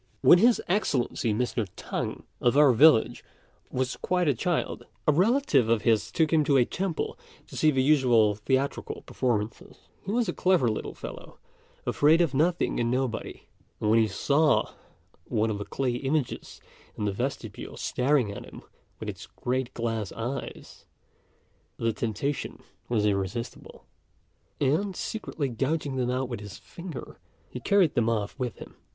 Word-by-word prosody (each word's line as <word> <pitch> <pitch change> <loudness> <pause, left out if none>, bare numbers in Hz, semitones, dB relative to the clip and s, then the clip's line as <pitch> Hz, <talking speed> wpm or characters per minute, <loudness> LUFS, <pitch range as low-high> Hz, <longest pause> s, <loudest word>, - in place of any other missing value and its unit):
When 175 - +7
His 235 +3 +5
Excellency 140 - 0
Mr. 115 -1 -1
T'ang, - - -4 0.2
of 120 +3 +3
our 145 -3 +7
village, 140 -1 +5 0.5
was 130 0 -2
quite 180 -2 0
a 145 - +4
child, 175 +8 -2 0.2
a - - +7
relative 180 - +3
of 115 -2 +2
his 110 -3 +2
took 160 -1 +1
him 155 -2 +5
to 140 -1 +4
a 125 - +5
temple 185 +2 -3 0.3
to - - -12
see 155 - +4
the 135 -3 +2
usual 125 -7 +4
theatrical 130 +7 -2
performances. 110 -4 -2 0.3
He 195 - -4
was 235 0 +1
a 175 - -1
clever 180 -10 +3
little 110 - -4
fellow, - - -9 0.5
afraid 155 +3 +4
of 165 -6 +2
nothing 165 +6 +1
and 120 -1 +1
nobody; 125 -2 -2 0.4
and 105 - +1
when 115 - +5
he 110 - +3
saw 145 +9 +2 0.5
one 110 +1 0
of 100 - -3
the 105 - -4
clay 130 -3 -1
images 135 0 -2 0.4
in 105 - -2
the 100 - +1
vestibule 115 -1 -5
staring 125 -4 +1
at - - -7
him - - -12 0.4
with - - -6
its - - -7
great 130 0 -2
glass 115 -3 -2
eyes, 125 +4 -6 0.9
the 115 -1 0
temptation 115 +6 -3 0.3
was 110 -3 +1
irresistible; 100 +3 -3 0.7
and, 170 +8 +1
secretly 165 -9 -3
gouging 135 +3 -2
them 125 -1 0
out 130 +1 -1
with 120 -3 -5
his 105 -2 -9
finger, 170 -5 -9 0.3
he 125 - -6
carried 190 +2 +3
them 115 -1 +2
off 105 -3 -1
with 125 -3 -2
him. - - -11
130 Hz, 160 wpm, -27 LUFS, 115-155 Hz, 0.9 s, When